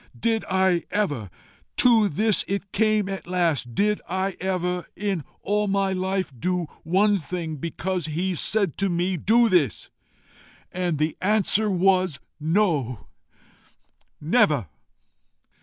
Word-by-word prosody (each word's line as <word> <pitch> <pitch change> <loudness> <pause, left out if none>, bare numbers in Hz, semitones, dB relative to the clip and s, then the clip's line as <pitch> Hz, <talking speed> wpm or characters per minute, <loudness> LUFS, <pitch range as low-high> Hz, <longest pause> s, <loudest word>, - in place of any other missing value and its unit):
Did 225 -1 +1
I 190 -2 +2
ever' 150 - -1 0.5
to 225 -4 +5
this 210 +3 +2
it 200 0 -3
came 215 -1 +2
at 195 -3 -5
last 165 -10 0
'Did 210 +1 +1
I 190 +1 -1
ever, 180 -1 -2
in 195 -5 -2 0.2
all 210 0 +1
my 195 -1 +1
life, 185 -3 -2
do 180 +4 -1 0.2
one 200 +5 +3
thing 165 -2 -5
because 170 +3 -3
he 175 +5 -1
said 195 0 0
to 200 -1 +1
me 175 +2 0
DO 230 +8 +3
THIS?' 175 -8 +1 0.8
And 180 -3 -1
the 155 +1 0
answer 210 +1 +2
was 185 -4 +2 0.2
NO, 155 - 0 1.1
NEVER. 150 - +2
185 Hz, 125 wpm, -24 LUFS, 170-200 Hz, 1.1 s, to